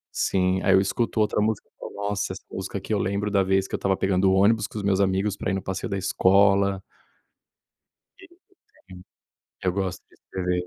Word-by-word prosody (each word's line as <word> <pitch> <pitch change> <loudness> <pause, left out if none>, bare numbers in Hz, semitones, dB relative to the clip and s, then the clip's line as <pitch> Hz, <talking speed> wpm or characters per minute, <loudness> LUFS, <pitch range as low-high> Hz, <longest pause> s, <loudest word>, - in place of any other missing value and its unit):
sim, 95 0 +1
aí - - +4
eu - - +6
escuto 115 +4 -1
outra 105 -1 +1
música, 110 -1 -1 0.3
"Nossa, 100 -1 -2
essa 95 - -11
música 95 +1 -5
que 110 - -4
eu 105 - +1
lembro 100 +2 -1
da 100 -1 +3
vez 95 0 +1
que - - -18
eu - - -2
estava 95 -1 0
pegando 95 0 +2
o - - +3
ônibus 105 +2 +3
com - - -10
os 105 - -4
meus 100 -1 +1
amigos 95 +1 +1
para - - -3
ir - - -1
no 95 - -3
passeio 95 - -4
da 100 - -2
escola". 100 +1 +3 1.4
Desde 360 -3 -17 0.4
pequeno 90 -1 -15 0.6
eu 90 - 0
gosto 95 -1 -3
de - - -25
escrever. 90 -1 -3
95 Hz, 205 wpm, -24 LUFS, 95-100 Hz, 1.4 s, eu